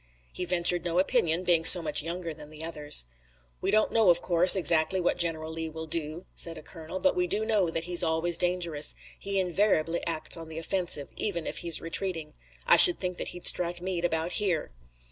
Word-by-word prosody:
He 180 - -5
ventured 175 -1 +2
no 170 0 -4
opinion, 185 -4 0
being 170 -3 +1
so 175 +1 +10
much 150 -2 -1
younger 170 +1 -7
than 150 -1 -13
the 155 +1 -9
others. 150 - 0 0.6
"We - - -3
don't 215 0 0
know, 220 -4 +2
of 175 0 +3
course, 175 +1 +6
exactly 170 -1 +2
what 175 - -1
General 160 -2 -3
Lee 160 0 -6
will 160 +1 -9
do," 160 +1 -5
said 165 -1 -1
a - - -12
colonel, 165 +3 -8
"but 280 - 0
we 360 0 -2
do 220 -8 -2
know 210 -6 -1
that 165 0 -4
he's 175 0 +2
always 165 0 -1
dangerous. 175 -4 0 0.2
He 200 0 -4
invariably 175 -3 -1
acts 160 -2 -3
on 165 -1 -10
the 160 - -10
offensive, 165 -4 -3
even 175 -6 -4
if - - -6
he's 170 -2 0
retreating. 165 -2 -3 0.3
I - - +5
should 355 -2 +9
think 180 -1 -6
that - - -3
he'd 175 - -7
strike 175 0 +1
Meade 180 -1 -5
about 165 0 -3
here." 180 - -3
170 Hz, 205 wpm, -26 LUFS, 160-180 Hz, 0.6 s, so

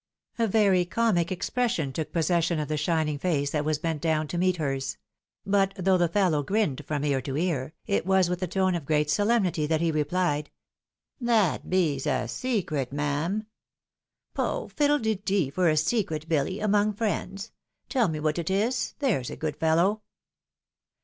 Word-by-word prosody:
" - - -35
A 230 - +3
very 195 -3 +3
comic 180 -2 +1
expression 185 - -1
took 155 +2 -4
possession 170 0 +1
of 150 - -3
the 155 - 0
shining 150 -1 0
face 145 -5 0
that 150 -1 0
was 155 0 0
bent 160 -2 -3
down 155 -2 +1
to 175 - -3
meet 185 0 +2
hers: 135 -4 -2 0.5
but, 195 -1 +2
though 185 0 +2
the 175 - +3
fellow 170 -4 +2
grinned 190 -3 0
from 150 -1 -1
ear 140 -2 +1
to 135 +2 -4
ear, 155 -4 -1
it 200 - 0
was 190 0 +3
with 180 +1 -3
a 185 - 0
tone 185 +1 +1
of 165 -5 -4
great 150 -1 +2
solemnity 200 -5 +1
that 160 0 +1
he 165 0 +1
repHed, 150 0 0 0.4
" - - -45
That 210 -8 +2
bees 160 -7 +1
a - - 0
secret, 170 - -2
mam! 150 +9 -1 0.3
" - - -66
" - - -60
Poh! - - -2
fiddle 295 0 +2
de 220 -4 0
de 190 -7 0
for 180 +3 +2
a 155 - +2
secret, 160 -2 0
Billy, 160 +4 0
among 210 0 +2
friends; 200 -2 -3 0.4
teU 250 -6 +2
me 155 -2 -3
what 155 +2 0
it 170 - -3
is, 220 +7 0
there's 210 - 0
a - - -6
good 155 -2 -3
fellow." 170 +7 +2
170 Hz, 185 wpm, -27 LUFS, 150-200 Hz, 0.5 s, A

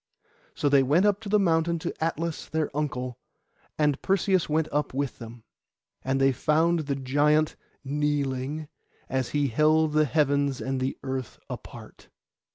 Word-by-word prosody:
So - - 0
they 140 -1 +5
went 150 +9 +3
up 205 0 +2
the 210 -1 +2
mountain 170 -3 +2
to 160 - -4
Atlas 165 0 -2
their 155 -3 -2
uncle, 130 -4 -3 0.6
and 150 -2 +1
Perseus 190 -2 +1
went 155 +1 +1
up 145 -3 -1
with 140 -1 -2
them. 115 -1 -10 0.6
And 135 +1 0
they 135 0 +4
found 160 +6 +2
the 140 - 0
giant 145 +3 +2 0.3
kneeling, 145 0 -1 0.4
as 130 -2 -1
he 145 -2 0
held 155 +4 +3
the 155 0 +4
heavens 140 -2 +1
and 135 0 -2
the 130 +1 -2
earth 130 -2 -4
apart. - - -10
150 Hz, 150 wpm, -26 LUFS, 135-160 Hz, 0.6 s, they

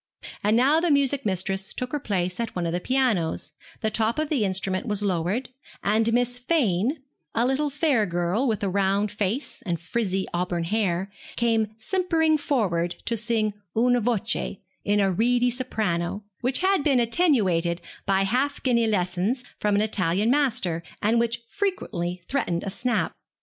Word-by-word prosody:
And 210 +2 +3
now 280 +6 +4
the 345 +1 +1
music 280 -3 +2
mistress 190 0 -1
took 250 0 -3
her 295 - -1
place 185 -6 -2
at 230 - -3
one 175 -1 -1
of 165 - -1
the 175 - 0
pianos, 235 -9 0 0.3
the 220 - 0
top 225 +3 +1
of 310 -1 -1
the 275 -8 +1
instrument 190 +2 0
was 210 -1 0
lowered, 195 +6 -1 0.3
and 220 +2 +2
Miss 245 +1 +1
Fane, 250 - +1 0.3
a 230 +1 +3
little 275 +3 +1
fair 280 -7 +1
girl 175 +9 0
with 220 -3 -1
a - - +1
round 200 +2 +1
face 210 +6 -3
and 175 -5 -2
frizzy 190 +1 -1
auburn 175 -1 -1
hair, 190 0 -1 0.2
came 225 -2 +1
simpering 320 - +1
forward 180 - 0
to 235 - 0
sing 220 -2 0 0.2
'Una 245 +1 +3
voce,' 225 -2 -1 0.3
in 205 0 +2
a 195 -1 +3
reedy 245 +5 +2
soprano, 210 -7 -2 0.2
which 255 +5 +1
had 380 -4 +3
been 275 -4 +3
attenuated 210 - +2 0.3
by 195 0 +3
half 260 +8 0
guinea 235 -3 +3
lessons 195 +5 0 0.2
from 210 -1 +1
an 205 - +3
Italian 200 +1 +1
master, 245 - +1 0.2
and 225 +3 +3
which 235 0 -1
frequently 180 - -3
threatened 175 -11 -1
a 195 - -4
snap. 240 +5 -1
220 Hz, 165 wpm, -25 LUFS, 190-250 Hz, 0.3 s, now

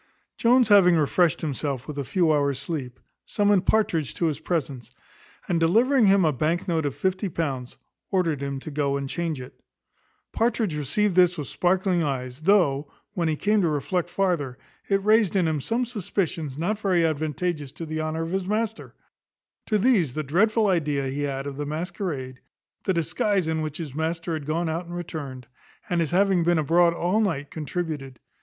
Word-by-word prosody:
Jones 245 0 +4
having 190 -4 +7
refreshed 160 +2 +2
himself 140 -3 -3
with 145 -1 -5
a - - -1
few 170 +3 +2
hours' 140 -2 +1
sleep, 140 -4 -5 0.2
summoned 205 -3 +1
Partridge 170 -10 +1
to 170 - 0
his 155 -3 -1
presence; 140 -8 -3 0.6
and 170 -2 +1
delivering 225 +8 +4
him 195 -2 +5
a 155 - +2
bank 160 +6 -1
note 160 -4 0
of 140 - -4
fifty 190 +1 -1
pounds, 135 -7 -3 0.3
ordered 170 -7 0
him 140 -1 -3
to 155 - -7
go 140 -1 0
and 140 -1 -4
change 165 -1 -3
it. 125 - -11 0.7
Partridge 225 -6 0
received 180 +8 0
this 180 0 +4
with 150 - -5
sparkling 185 0 +1
eyes, 130 -2 -3
though, 155 -6 +2 0.2
when 170 -3 0
he 155 - +1
came 210 +6 +2
to 170 - +2
reflect 175 +4 -1
farther, 175 -9 -1 0.3
it 195 -1 +2
raised 215 -2 +3
in 180 -4 +3
him 155 -3 -1
some 235 - -1
suspicions 175 - -3
not 200 +7 -1
very 185 -5 +2
advantageous 155 -1 -2
to 165 - -7
the 155 0 -3
honour 155 +1 -2
of 165 - -5
his 190 -1 -2
master: 220 +1 -2 0.7
to 215 - +2
these 200 - +2
the 155 - -1
dreadful 215 - +2
idea 150 -8 +1
he 140 +2 -3
had 135 -1 -2
of 140 -1 -6
the 145 - -3
masquerade, 155 -5 -4 0.5
the 190 - +2
disguise 175 +4 0
in 160 0 -1
which 155 -1 -4
his 155 -6 -6
master 165 +2 -2
had 155 -3 -4
gone 165 +2 0
out 165 +2 -3
and 175 - -7
returned, 145 -7 -6 0.5
and 175 -1 +2
his 160 - 0
having 190 -1 +3
been 175 0 +3
abroad 170 +3 +4
all 180 +5 +1
night, 155 -10 -1
contributed. 150 -5 -4
165 Hz, 185 wpm, -25 LUFS, 145-190 Hz, 0.7 s, having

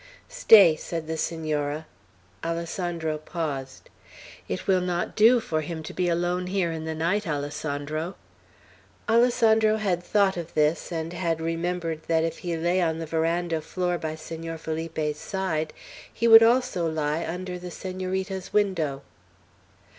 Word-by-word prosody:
"Stay," 220 - +7
said 165 +1 -5
the 160 +1 -3
Senora. 155 -2 -2 0.6
Alessandro 165 -1 -2
paused. 150 -5 -5 0.6
"It 90 - -4
will 190 -2 +3
not 175 -1 -2
do 230 +3 +6
for 160 -8 -2
him 160 +1 -5
to - - -7
be 180 -1 0
alone 175 +1 0
here 185 -3 0
in 160 -1 -5
the 160 0 -3
night, 175 +6 0
Alessandro." 150 +3 -3 0.9
Alessandro 225 -2 +4
had 190 -5 0
thought 195 0 +2
of 170 -1 -6
this, 155 +3 +1
and 165 0 -3
had 170 -2 -1
remembered 165 0 -2
that 160 -1 +2
if 165 0 -3
he 170 -2 -3
lay 175 +3 +1
on 160 -2 +1
the 165 - -4
veranda 165 +1 0
floor 180 +1 -2
by 155 0 -3
Senor 165 +1 -6
Felipe's 160 -1 -3
side, 165 -6 -2 0.4
he 235 - 0
would 225 0 +10
also 230 -7 +3
lie 155 +1 -1
under 180 +2 -5
the 180 0 -7
Senorita's 185 +1 -4
window. 165 -10 0
170 Hz, 145 wpm, -26 LUFS, 160-185 Hz, 0.9 s, would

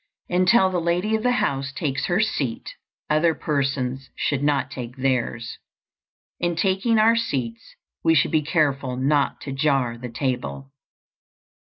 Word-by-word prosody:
Until 185 +2 +4
the 180 -2 0
lady 175 +6 0
of 220 - -1
the 250 +2 +2
house 140 - -1
takes 140 -1 -2
her 175 +2 +1
seat, 135 - -2 0.3
other 155 +2 +2
persons 135 -3 -2
should 140 -2 -1
not 145 -1 +1
take 125 -1 -7
theirs. 125 -3 -2 0.8
In 175 0 0
taking 195 +6 +1
our 225 +2 +5
seats 125 - -3 0.3
we 165 - +4
should 145 - +3
be 155 - +3
careful 140 -5 0
not 140 +2 +1
to 140 - -6
jar 135 -4 0
the 125 0 -6
table. 90 - -3
140 Hz, 145 wpm, -23 LUFS, 130-175 Hz, 0.8 s, our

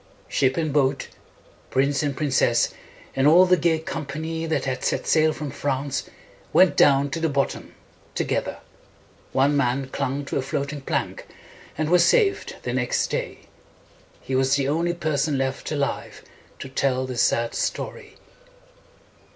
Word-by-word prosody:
Ship 130 -1 +1
and 155 -3 -1
boat, 140 -2 +1 0.6
prince 140 +2 +1
and 145 -3 -2
prin 145 -2 -1
cess, 130 - +2 0.4
and 135 +1 +3
all 175 +4 +7
the 180 0 +5
gay 165 -1 +2
com 160 0 -5
pa 140 +1 -6
ny 160 +1 -3
that 160 - -1
had 130 -1 -3
set - - -1
sail 155 0 +3
from 150 -2 -5
France, 140 0 -2 0.4
went 185 -1 +5
down 140 0 +4
to 165 - -2
the 165 0 0
bottom 140 -1 -2 0.4
together. - - -1 0.7
One 140 +2 +2
man 130 0 0
clung 140 +1 -3
to - - -3
a - - +1
floating 140 +2 -3
plank, - - -3 0.5
and 155 0 0
was 175 +1 +5
saved 420 - +2
the - - -3
next - - 0
day. - - -3 0.8
He 135 - -6
was 130 +1 +3
the 140 -1 0
only 170 +4 0
person 150 -3 0
left 130 +2 -2
alive 145 -2 -3 0.3
to - - -7
tell 130 -1 0
the 130 -1 -5
sad 115 0 +1
story. - - -4
140 Hz, 160 wpm, -24 LUFS, 135-160 Hz, 0.8 s, all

